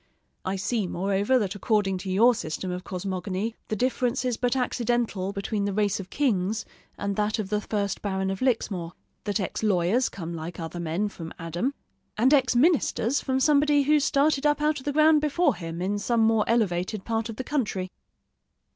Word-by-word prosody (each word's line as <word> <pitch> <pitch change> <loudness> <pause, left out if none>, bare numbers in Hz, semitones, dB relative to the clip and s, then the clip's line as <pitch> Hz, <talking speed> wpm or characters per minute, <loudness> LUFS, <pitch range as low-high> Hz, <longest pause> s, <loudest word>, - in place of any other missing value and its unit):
I 190 - -2
see, 205 +1 -1
moreover, 200 +7 +1
that 205 -5 -1
according 205 -2 0
to 190 - -6
your 230 +6 +5
system 180 -2 -4
of 180 0 -4
cosmogony, 190 +3 -3
the 215 - -2
difference 250 +2 0
is 250 -2 +1
but 245 +2 0
accidental 240 -6 0
between 200 +1 -2
the 200 - -1
race 205 -1 +1
of 190 -1 -7
kings 215 -5 0 0.3
and 200 0 -2
that 210 0 +1
of 210 -3 -3
the 210 0 +1
first 205 -2 -2
Baron 190 -1 -1
of 195 - -4
Lixmore: 200 -9 -1 0.3
that 205 +1 0
ex 190 - -3
lawyers 205 +4 +2
come 170 -3 -6
like 165 +2 -6
other 165 +1 -5
men 170 +5 -1
from 165 -5 -8
Adam, 175 - -2 0.4
and 255 +6 +4
ex 265 -3 +3
ministers 280 -3 +2
from 265 -1 0
somebody 290 0 +4
who 300 +2 +4
started 285 0 +2
up 295 0 +3
out 300 0 +1
of 260 - -14
the 290 - 0
ground 310 0 +5
before 305 +4 +2
him, 165 0 -5
in 205 +2 -1
some 235 +2 +1
more 225 -1 +3
elevated 200 -3 0
part 225 0 -1
of 225 - -5
the 260 - -4
country. 200 -10 -2
210 Hz, 190 wpm, -26 LUFS, 190-255 Hz, 0.4 s, your